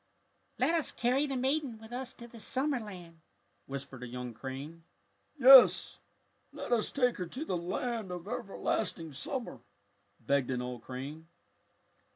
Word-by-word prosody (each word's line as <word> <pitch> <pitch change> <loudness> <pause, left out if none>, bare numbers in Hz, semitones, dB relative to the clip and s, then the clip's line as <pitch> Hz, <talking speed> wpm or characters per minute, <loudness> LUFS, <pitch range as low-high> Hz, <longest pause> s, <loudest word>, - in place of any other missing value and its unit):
"Let 330 - +2
us 330 -3 +3
carry 255 +5 +1
the 270 -2 -2
maiden 265 -1 0
with 220 +1 -13
us 255 +1 -4
to 235 - -10
the 230 -1 -13
summer 265 +4 0
land!" 180 -6 -10 0.5
whispered 135 -1 -6
a 125 - -5
young 125 0 -6
crane. 140 +7 -7 0.5
"Yes, 265 -1 +8 0.5
let - - -7
us 230 -3 +2
take 250 -3 +2
her 180 -2 -3
to 260 - -5
the 185 - -1
land 210 +5 -3
of 180 +1 -6
ever 240 -3 -5
lasting 165 -3 -1
summer," 185 - -4 0.6
begged 135 +2 +1
an 125 -1 -1
old 125 -1 -5
crane. 140 +6 -7
195 Hz, 155 wpm, -32 LUFS, -, 0.6 s, Yes